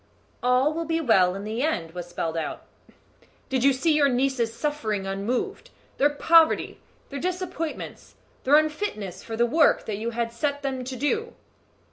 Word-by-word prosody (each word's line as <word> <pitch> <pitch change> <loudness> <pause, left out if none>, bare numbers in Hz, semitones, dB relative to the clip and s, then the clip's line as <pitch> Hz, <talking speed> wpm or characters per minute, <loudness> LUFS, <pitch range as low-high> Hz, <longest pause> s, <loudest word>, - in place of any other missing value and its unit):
"All 250 +4 +3
will 330 +1 -3
be 325 +1 0
well 190 - +3
in 195 - -6
the 220 +3 -3
end," 180 - -1
was 175 0 -7
spelled 165 -2 -3
out. 160 -2 -4 0.8
"Did 260 -2 0
you 275 - +6
see 290 +5 +1
your 290 -2 +4
nieces' 250 -2 +1
sufferings 225 -7 -2
unmoved 225 - -3 0.3
their 290 - +5
poverty, 325 +2 +3 0.3
their 280 - -5
disappointments, 360 -2 -4 0.3
their 280 +3 +5
unfitness 300 - -2
for 225 -1 -6
the 235 - +4
work 300 +5 +3
that 210 -2 -4
you 230 +2 -2
had 235 0 -3
set 285 +4 -2
them 265 -2 -2
to 260 +1 -5
do?" 435 - -1
260 Hz, 165 wpm, -25 LUFS, 220-305 Hz, 0.8 s, you